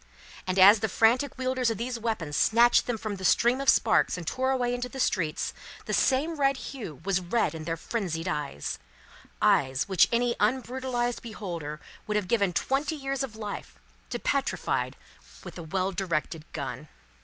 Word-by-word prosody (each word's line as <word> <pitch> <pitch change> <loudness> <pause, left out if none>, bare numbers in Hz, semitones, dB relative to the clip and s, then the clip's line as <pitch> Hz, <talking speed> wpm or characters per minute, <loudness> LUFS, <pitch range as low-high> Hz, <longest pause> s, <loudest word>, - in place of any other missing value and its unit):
And 185 +1 -1
as 200 +3 +8
the 220 0 -1
frantic 245 +8 +2
wielders 255 -1 0
of 225 - -2
these 240 +1 -3
weapons 210 -10 -2
snatched 235 +8 +4
them 240 -2 -1
from 215 -2 -4
the 190 - -9
stream 240 +7 +3
of 275 - +2
sparks 220 -4 +3
and 175 - -6
tore 260 +10 -1
away 250 -2 +1
into 245 0 -3
the 265 - -8
streets, 165 -10 0 0.3
the - - -3
same 300 +5 +2
red 275 -1 +3
hue 225 - -7
was 195 -2 +2
red 185 +5 0
in 160 -1 -7
their 165 0 -2
frenzied 180 -4 -3
eyes; 150 - -3 0.6
eyes 130 +2 +3
which 190 -3 +5
any 235 0 +1
unbrutalised 250 -1 -1
beholder 170 -9 -6 0.3
would 210 - -1
have 210 -3 0
given 200 -3 +2
twenty 275 - 0
years 275 -2 -3
of 260 -5 -4
life, 210 -2 -6 0.3
to - - -2
petrify - - -1 0.5
with - - -9
a - - -6
well 185 +4 -1
directed 170 -4 -2
gun. 150 +1 -5
220 Hz, 175 wpm, -27 LUFS, 175-250 Hz, 0.6 s, as